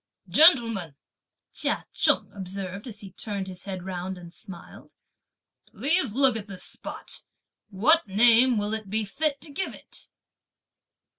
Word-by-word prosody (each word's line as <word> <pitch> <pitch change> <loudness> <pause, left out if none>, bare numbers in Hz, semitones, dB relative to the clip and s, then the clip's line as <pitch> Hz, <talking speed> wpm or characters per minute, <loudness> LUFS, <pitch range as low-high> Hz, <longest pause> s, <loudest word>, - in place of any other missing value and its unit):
"Gentlemen," 230 - +5 0.6
Chia - - -1
Cheng - - +2
observed, 195 +2 -6
as 215 -4 -7
he 195 -2 -10
turned 200 0 -4
his 185 -1 -8
head 190 -3 -5
round 185 0 -5
and 170 -1 -12
smiled, 185 -3 -11 0.7
"please 295 - 0
look 265 +1 +3
at 210 -2 -5
this 195 -3 -8
spot. - - -5 0.5
What 245 - +4
name 235 +4 +5
will 205 +1 -1
it 215 -3 -4
be 215 +1 0
fit 285 +7 -1
to 300 - -9
give 380 +7 -4
it?" - - -14
205 Hz, 140 wpm, -26 LUFS, 190-250 Hz, 0.7 s, Gentlemen